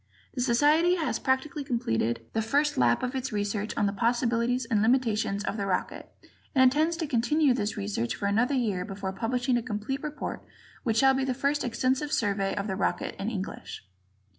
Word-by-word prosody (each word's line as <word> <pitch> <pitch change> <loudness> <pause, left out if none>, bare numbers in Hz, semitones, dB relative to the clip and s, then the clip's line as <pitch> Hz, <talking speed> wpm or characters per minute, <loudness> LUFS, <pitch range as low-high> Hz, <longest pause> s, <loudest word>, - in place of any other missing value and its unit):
The 250 - -3
Society 295 +8 +4
has 325 -3 -1
practically 280 +3 -1
completed 120 - -1
the 225 - +1
first 285 +7 +1
lap 120 -1 +2
of 250 +1 -1
its 265 0 -3
research 205 0 -2
on - - +2
the 200 - 0
possibilities 235 +2 +1
and 225 -3 +1
limitations 220 -4 +1
of 215 - -3
the 200 -1 -2
rocket, 185 -2 -3 0.4
and 260 - +6
intends 310 +6 +3
to 335 - -2
continue 280 +2 +2
this 210 -4 -2
research 105 +4 -2
for - - -4
another 230 +7 +2
year 210 -8 0
before 195 0 -5
publishing 245 +4 0
a - - 0
complete 235 +4 -4
report 300 0 -5 0.4
which 225 -3 0
shall 270 +3 +5
be 265 0 0
the 260 -1 -1
first 280 +2 0
extensive 260 +4 0
survey 200 -5 0
of 200 - -2
the 190 -3 -2
rocket 195 - -1
in 200 - -1
English. 195 - -6
235 Hz, 190 wpm, -28 LUFS, 205-265 Hz, 0.4 s, and